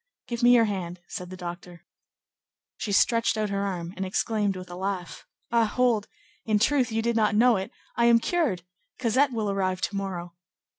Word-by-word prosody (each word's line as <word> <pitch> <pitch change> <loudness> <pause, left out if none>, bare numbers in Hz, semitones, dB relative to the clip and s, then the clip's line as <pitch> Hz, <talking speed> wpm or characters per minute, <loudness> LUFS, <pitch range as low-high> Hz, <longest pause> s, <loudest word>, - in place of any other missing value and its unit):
"Give 235 0 -4
me 245 +1 +7
your 230 -1 +5
hand," 185 -4 -4
said 180 -1 -6
the 185 - -8
doctor. 175 -1 -8 0.9
She 210 - -3
stretched 230 +3 +3
out 215 -2 -1
her 200 0 -1
arm, 180 -3 -4
and 190 - -3
exclaimed 205 +1 0
with 185 -1 -8
a - - -6
laugh:— 185 -1 -4 0.2
"Ah, 235 -1 +4
hold! 230 -2 +1 0.4
in 215 -2 +2
truth, 255 +2 +2
you 225 0 0
did 235 0 0
not 215 -2 +2
know 240 +2 +5
it; 190 - -4 0.3
I 235 - +3
am 235 0 +7
cured; 230 - 0 0.3
Cosette 260 +3 +2
will 220 -4 -1
arrive 185 -2 -1
to 200 - -2
morrow." 180 -3 -4
205 Hz, 190 wpm, -26 LUFS, 185-235 Hz, 0.9 s, me